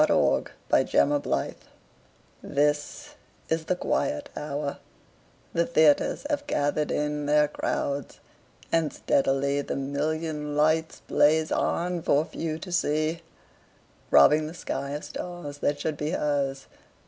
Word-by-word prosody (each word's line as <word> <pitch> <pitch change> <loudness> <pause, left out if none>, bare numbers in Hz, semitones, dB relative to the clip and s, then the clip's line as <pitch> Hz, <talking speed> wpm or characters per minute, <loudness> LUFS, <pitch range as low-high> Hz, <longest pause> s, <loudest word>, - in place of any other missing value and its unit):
Sara - - +3 0.3
Teasdale - - +4
Broadway 70 - -2 0.9
THIS 145 +1 -1 0.4
is 160 0 0
the 180 - +1
quiet 290 +9 -1
hour; 145 -1 -4 0.7
the 170 0 +1
theaters 155 - +3
Have 290 -1 -2
gathered 145 - 0
in 150 0 -1
their 150 0 +4
crowds, 140 -2 -3 0.5
and 165 -2 +2
steadily 140 +1 +1
The - - -4
million 150 +2 -2
lights 160 +2 +1
blaze 155 +2 +3
on 175 0 0
for 150 0 +2
few 160 -2 -4
to 170 +3 -8
see, 155 -1 0 0.9
Robbing 150 - +6
the 160 - -8
sky 140 -4 -4
of 150 - -4
stars 175 -5 -7
that 145 0 0
should 155 -1 -2
be 150 +1 -2
hers. 140 -4 -1
150 Hz, 125 wpm, -26 LUFS, 145-160 Hz, 0.9 s, Robbing